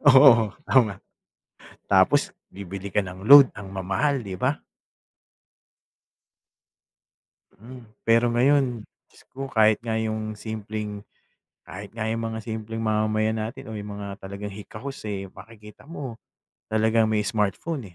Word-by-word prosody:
Oo 130 -5 +7 0.2
tama. 110 -7 +3 0.9
Tapos - - +4 0.2
bibili 95 0 -7
ka 105 - +2
ng 95 +2 -9
load, 140 -2 +10
ang 105 -3 -8
mamahal, 100 +8 -1
'di 95 -2 -6
ba? - - 0 2.9
Mm. 120 +2 -13 0.2
Pero 115 +1 +3
ngayon, 130 -2 +2 0.2
Diyos - - -21
ko, 135 +1 -6
kahit 110 -4 +3
nga 115 - -2
'yong 110 -1 -2
simpleng 105 -1 -6 0.6
kahit 100 +1 -9
nga 110 -1 -3
'yong 115 +1 -2
mga 110 - -4
simpleng 110 0 -5
mamamayan 110 0 0
natin 115 +5 -5
o 110 - -6
'yong 105 0 -6
mga 100 - -6
talagang 100 +1 -7
hikahos, 110 +7 -9
eh, 100 -2 -4
makikita 105 +3 -15
mo 140 -7 -7 0.5
talagang 110 0 +2
may 105 -1 0
smartphone, 105 - -2
110 Hz, 125 wpm, -24 LUFS, 105-115 Hz, 2.9 s, load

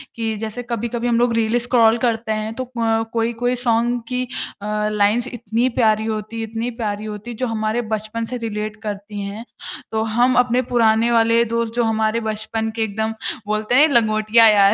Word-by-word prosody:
कि 225 -1 -2
जैसे 220 +3 -5
कभी-कभी 235 +1 -2
हम 235 -1 +2
लोग 240 -1 +2
रील 230 +1 +2
स्क्रॉल 235 -1 +4
करते 225 -2 -1
हैं 215 +1 -2
तो 255 - -3
क 225 -1 +1
कोई-कोई 235 +2 0
सॉन्ग 240 0 +1
की 250 +1 -1 0.4
अ, - - -6 0.3
लाइंस 210 +4 +2
इतनी 235 0 -1
प्यारी 220 -2 +3
होती 220 +1 -4
इतनी 225 +2 -3
प्यारी 210 0 -2
होती 210 +2 -6
है - - -7
जो 255 - -1
हमारे 220 +1 -1
बचपन 215 +2 -3
से 250 +2 -5
रिलेट 215 -2 -4
करती 205 0 -5
है। 200 +3 -6 0.5
तो 220 0 0
हम 240 +3 +2
अपने 250 0 +3
पुराने 230 -1 +2
वाले 230 0 +4
दोस्त 230 0 -2
जो 240 - +2
हमारे 220 0 +1
बचपन 220 0 -3
के 225 - 0
एकदम 220 +1 -2 0.3
बोलते 215 +3 0
हैं 295 +4 +7
लंगोटिया 220 0 +5
यार 200 -1 +6
225 Hz, 185 wpm, -20 LUFS, 215-235 Hz, 0.5 s, हैं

